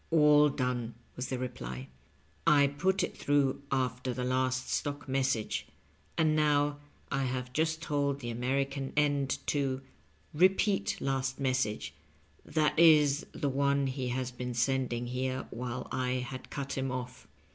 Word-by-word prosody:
"All 150 -2 +6
done," 125 -3 -2 0.2
was 125 - -3
the 130 - -2
reply; 65 - -5 0.3
" - - -18
I 140 - +6
put 185 +8 +1
it - - -3
through 140 -2 +1
after 125 -1 -1
the 125 - -2
last 130 0 0
stock 145 -1 -2
message, 130 -5 0 0.5
and 155 -2 +3
now 145 -1 +2 0.3
I 135 -1 0
have 125 0 -3
just 160 +2 0
told 140 -2 0
the 120 -3 -4
Ameri 130 +4 +1
can 135 -1 -5
end 145 -2 +2
to 135 -2 0 0.3
* 75 +3 -35
repeat 190 +5 +3
last 135 0 -1
message' 110 - 0 0.3
— - - -24
^that 155 -2 +2
is, 150 -3 +6
the 145 - -2
one 140 +1 +2
he 130 -1 -2
has 125 0 -2
been 125 0 -5
sending 125 -1 0
here 130 +1 -2
while 125 +1 -4
I 125 -1 0
had 130 0 -5
cut 140 -1 -4
him 130 -1 -1
off. 125 0 -6
135 Hz, 155 wpm, -31 LUFS, 125-145 Hz, 0.5 s, All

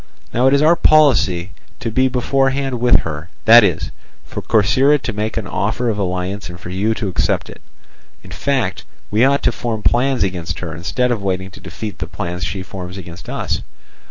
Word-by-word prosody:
Now 125 +3 +3
it 135 - +4
is 140 - +3
our 165 +3 +6
policy 130 - +3 0.3
to 115 - -3
be 130 +4 +3
beforehand 135 +1 0
with 120 +1 +4
her—that 90 +9 +4
is, 90 -6 0 0.3
for - - -6
Corcyra 130 +7 +3
to - - -3
make 105 +2 -3
an 110 - -2
offer 115 +5 -1
of 105 -2 -2
alliance 95 +1 -3
and 85 0 -9
for 90 -1 -8
you 105 +4 0
to 110 - -3
accept 90 - -1
it; - - -14 0.6
in 95 - -13
fact, 110 0 -1 0.3
we 110 +3 +3
ought 140 +1 +3
to - - +3
form 115 -2 -4
plans 130 -1 +2
against 90 -3 -3
her 80 -3 -5
instead 110 +9 -1
of 115 -4 -1
waiting 95 -1 -2
to - - -13
defeat 105 -4 -7
the - - -4
plans 90 0 -5
she 95 +3 -3
forms 95 -1 -8
against 90 0 -10
us. - - -2
105 Hz, 190 wpm, -18 LUFS, 95-125 Hz, 0.6 s, our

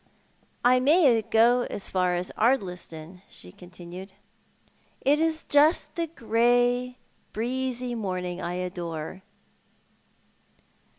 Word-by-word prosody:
"I 255 +1 +5
may 275 -4 +4
go 235 +3 +3
as 200 - -5
far 180 -1 0
as 175 +1 -3
Ardliston," 180 -7 -2
she 90 - -11
continued. 180 - -11 0.9
'"It 290 +3 +3
is 320 0 0
just 295 +3 +3
the 335 -2 -2
grey, 245 -1 +1 0.4
breezy 250 +2 -2
morning 185 -5 -4
I 175 +1 -3
adore." 175 -1 -5
225 Hz, 100 wpm, -26 LUFS, 180-255 Hz, 0.9 s, I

